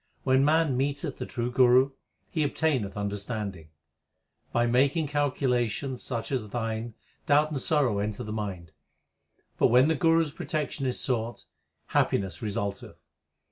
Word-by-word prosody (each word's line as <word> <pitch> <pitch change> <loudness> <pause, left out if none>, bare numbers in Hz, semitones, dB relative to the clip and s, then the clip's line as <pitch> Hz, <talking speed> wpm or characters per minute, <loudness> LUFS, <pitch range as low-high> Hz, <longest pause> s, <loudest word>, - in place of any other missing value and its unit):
When 130 0 +3
man 155 -2 +3
meeteth 140 +2 -2
the - - -4
true 120 0 -3
Guru, 130 +2 +5 0.4
he 160 - -1
obtaineth 140 -9 0
under 100 0 -2
standing. 100 -6 -5 0.8
By 120 0 +2
making 140 +6 +2
calculations 130 -3 0
such 115 -2 -4
as 120 -6 -2
thine 115 0 -3 0.3
doubt 150 +2 +4
and 140 -3 -2
sorrow 130 -10 +1
enter 105 0 -3
the 105 - -5
mind; 95 -6 -5 0.9
But, - - +6
when 125 +5 +5
the 160 - +2
Guru 165 +1 +3
s 150 - -7
protection 150 -3 -3
is 125 - 0
sought, 120 -3 -1 0.4
happiness 95 -1 0
result 100 -2 -2
eth. - - -14
125 Hz, 145 wpm, -27 LUFS, 105-145 Hz, 0.9 s, But